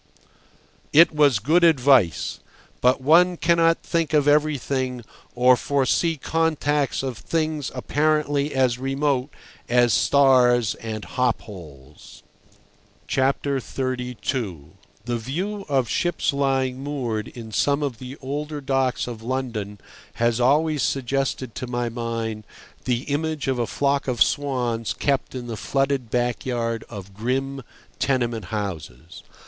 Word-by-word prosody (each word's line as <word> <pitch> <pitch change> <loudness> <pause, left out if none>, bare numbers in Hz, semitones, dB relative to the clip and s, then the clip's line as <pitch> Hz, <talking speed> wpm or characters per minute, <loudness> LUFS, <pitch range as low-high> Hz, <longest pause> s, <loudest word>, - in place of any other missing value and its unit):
It 165 +3 +7
was 145 -5 +4
good 155 - +2
advice. 135 - +3 0.4
But 125 +2 +3
one 175 +6 +5
cannot 165 0 +3
think 165 -2 -1
of 150 -1 +3
everything 140 -4 +1 0.3
or 125 +1 +5
foresee 140 +6 +1
contacts 150 -3 0
of 130 -5 -4
things 155 +3 -2
apparently 145 +1 0
as 130 -3 +1
remote 135 0 0 0.4
as 120 -1 +4
stars 125 -4 +4
and 110 -2 -6
hop 125 -3 0
poles. 75 - -13 0.8
XXXII. 130 -2 -1 0.9
The 120 -1 -1
view 190 - -4
of 135 -4 +1
ships 175 +3 0
lying 135 -2 0
moored 130 -7 -3
in 115 -2 -10
some 140 +6 +1
of 130 -5 -3
the 130 +2 -8
older 150 +3 -4
docks 135 -2 0
of 120 -3 -7
London 115 -5 -4 0.4
has 120 0 +1
always 150 +4 +2
suggested 130 -1 -1
to 125 - -5
my 120 -1 -2
mind 115 -2 -4 0.4
the 125 0 0
image 150 0 -2
of 130 -2 0
a 120 - 0
flock 140 0 0
of 125 -3 -2
swans 125 -5 -1
kept 140 -2 -1
in 125 -1 -5
the 115 -2 -5
flooded 135 +1 -1
backyard 120 -1 -1
of 100 -3 -9
grim 135 +6 -2 0.4
tenement 120 -6 0
houses. 85 - -6
130 Hz, 120 wpm, -23 LUFS, 120-145 Hz, 0.9 s, It